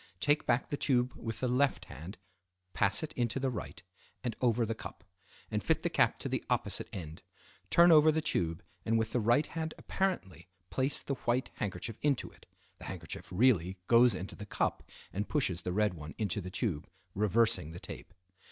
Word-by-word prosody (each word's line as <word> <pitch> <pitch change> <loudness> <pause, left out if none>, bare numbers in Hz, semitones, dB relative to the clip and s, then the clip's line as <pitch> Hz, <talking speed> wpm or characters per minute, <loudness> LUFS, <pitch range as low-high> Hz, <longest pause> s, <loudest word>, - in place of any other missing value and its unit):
Take 145 +6 +2
back 120 +1 +2
the 145 - -2
tube 125 -2 +2
with 115 0 -5
the 130 - +1
left 135 +3 +2
hand, 80 +9 -9 0.6
pass 105 - +3
it 155 - -5
into 120 +1 0
the 135 -1 0
right, 115 - -6 0.4
and 120 - -2
over 120 -2 +3
the 115 - -1
cup; - - -9 0.5
and - - -1
fit - - +1
the - - 0
cap - - +3
to - - -3
the - - -1
opposite - - 0
end. 80 -4 -7 0.5
Turn 170 0 +7
over 155 0 +7
the 155 - +1
tube, 85 - -1 0.2
and 115 +1 +2
with 110 0 0
the 125 - +2
right 120 +7 +3
hand 160 0 -4
apparently 95 - -2 0.2
place 135 +2 0
the 140 - -2 0.2
white 125 +2 +1
handkerchief 100 +3 -4
into 145 -3 +1
it - - -20 0.3
(the - - -9
handkerchief - - -6
really 95 -3 +3
goes 120 0 +6
into 95 +1 -5
the 105 - -9
cup - - 0 0.3
and 100 +2 -2
pushes 95 - 0
the 90 - -3
red 105 +1 +2
one 75 -2 -9
into 105 -1 -1
the 90 - -6
tube, 90 - -2 0.2
reversing 105 -4 +2
the 85 +2 -8
tape). - - -9
115 Hz, 190 wpm, -32 LUFS, 95-130 Hz, 0.6 s, Turn